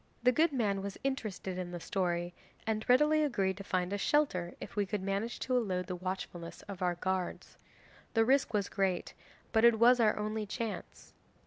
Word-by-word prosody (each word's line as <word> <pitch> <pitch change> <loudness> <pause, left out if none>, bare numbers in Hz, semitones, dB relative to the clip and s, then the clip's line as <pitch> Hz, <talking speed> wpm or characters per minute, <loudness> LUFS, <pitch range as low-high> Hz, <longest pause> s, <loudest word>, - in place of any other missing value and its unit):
The 250 - +6
good 315 +5 +3
man 210 -7 0
was 200 0 -5
interested 215 -8 -3
in 180 -1 -4
the 175 0 -5
story, 175 -1 -1 0.3
and 220 -1 -1
readily 300 +5 +5
agreed 200 -10 +1
to 200 - -7
find 185 -1 -1
us 205 - -2
shelter 185 -14 +1
if - - -8
we 205 - +2
could 200 0 -3
manage 200 +4 -2
to 255 - 0
elude 185 -7 0
the 180 +1 -4
watchfulness 180 -2 -5
of 200 -2 -8
our 180 -1 +1
guards. 185 +1 -3 0.6
The 225 0 +5
risk 270 +3 +3
was 205 -2 0
great, 190 -3 -1 0.4
but 220 -1 +3
it 235 -1 +7
was 245 +2 +6
our 215 -2 +4
only 215 0 -2
chance. 225 0 -5
200 Hz, 190 wpm, -32 LUFS, 185-235 Hz, 0.6 s, it